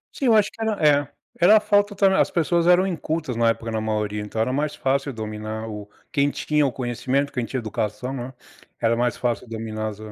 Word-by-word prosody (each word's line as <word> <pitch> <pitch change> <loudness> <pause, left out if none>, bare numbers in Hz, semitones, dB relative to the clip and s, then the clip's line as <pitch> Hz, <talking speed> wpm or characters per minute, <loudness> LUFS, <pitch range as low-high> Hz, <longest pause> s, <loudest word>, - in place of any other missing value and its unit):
Sim, 275 - -3
eu 225 - +6
acho 205 -2 +3
que 225 - -12
era 220 -1 +1 0.4
é, - - -32 0.3
era 200 +5 +8
a - - +5
falta 205 -1 +2
também 195 -1 +3
as - - +3
pessoas 170 0 +1
eram 180 +1 +5
incultas 160 -7 -3
na 115 0 +3
época, 115 0 -2
na 110 - -1
maioria, 105 -1 -2
então 105 +1 -5
era 115 +3 +1
mais 150 +2 -1
fácil 135 0 0
dominar 110 0 -5
o 105 -2 -7 0.2
quem 140 -1 +2
tinha 150 0 +1
o 130 - -2
conhecimento, 130 +3 -1
quem 125 - -1
tinha 130 - -4
educação, 110 +3 -3
não 125 -3 -4
é? 130 - -12 0.5
Era 115 0 +2
mais 120 -1 0
fácil 120 -1 -2
dominar 110 -1 -4
as 105 -1 -6
125 Hz, 225 wpm, -23 LUFS, 110-165 Hz, 0.5 s, era